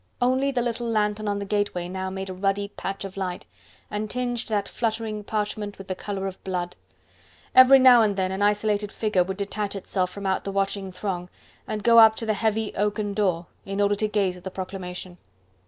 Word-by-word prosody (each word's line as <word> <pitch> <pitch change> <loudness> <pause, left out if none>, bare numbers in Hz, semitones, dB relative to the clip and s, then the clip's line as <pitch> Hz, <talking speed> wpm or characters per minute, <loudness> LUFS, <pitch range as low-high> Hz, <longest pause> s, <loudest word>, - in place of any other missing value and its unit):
Only 260 +2 +2
the 250 -3 0
little 235 0 -2
lantern 210 -1 0
on 205 0 0
the 200 - -4
gateway 205 -4 -1
now 190 +1 -4
made 190 0 -5
a - - -5
ruddy 195 +2 -1
patch 195 -1 -5
of 195 0 -8
light, 185 -2 -3 0.5
and 210 +1 -3
tinged 245 -1 -2
that 205 -2 0
fluttering 220 -2 -2
parchment 210 -1 -3
with 195 - -10
the - - 0
colour 195 +1 -4
of 190 -1 -6
blood. 180 -2 -3 0.8
Every 255 +1 +9
now 255 -2 +8
and 210 -2 +2
then 190 -1 0
an 190 +1 -3
isolated 210 0 +1
figure 210 -5 +1
would 190 +1 -5
detach 205 0 -3
itself 185 -1 -1
from 200 +1 -8
out 190 -1 0
the 200 - -4
watching 195 -1 -1
throng, 180 -1 -4 0.4
and 210 -1 -3
go 230 +1 +7
up 220 -1 +8
to 225 - -3
the 215 - +1
heavy, 220 +1 0
oaken 205 0 -1
door, 185 -5 0 0.2
in 195 0 -4
order 205 0 +3
to 215 +1 0
gaze 195 -3 0
at 180 - -14
the 190 - -4
proclamation. 185 -1 -7
205 Hz, 205 wpm, -25 LUFS, 190-215 Hz, 0.8 s, Every